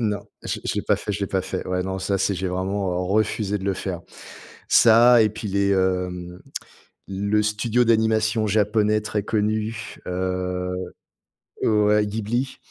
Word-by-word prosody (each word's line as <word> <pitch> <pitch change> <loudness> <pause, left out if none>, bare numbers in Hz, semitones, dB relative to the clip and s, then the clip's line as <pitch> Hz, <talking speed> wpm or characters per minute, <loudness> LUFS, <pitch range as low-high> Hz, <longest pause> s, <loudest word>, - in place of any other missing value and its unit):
Non, 105 -2 -2 0.2
je - - -3
l'ai - - -11
je - - -1
l'ai - - -1
pas - - +2
fait, 105 - -4
je 100 - -4
l'ai 100 - -1
pas 95 - 0
fait. 95 0 -4
Ouais, 90 0 0
non, 95 0 -3
ça, 95 +1 0
c'est 95 +1 +1
j'ai 95 +1 -2
vraiment, 95 +1 -2
heu, - - -2
refusé 105 +2 0
de 95 - -8
le 100 -1 0
faire. 90 -2 -4 0.7
Ça, 120 +1 +7
et 110 - +3
puis 110 0 -6
les, 100 0 +1
hem, 90 -2 -1 0.7
le 100 +2 0
studio 115 +3 +1
d'animation 110 -1 +2
japonais 105 +1 +2
très 105 -1 -3
connu, 110 +1 -2
heu, 90 0 -2 0.9
ouais, 105 -1 +3
Ghibli. 110 +5 -2
105 Hz, 170 wpm, -23 LUFS, 95-110 Hz, 0.9 s, Ça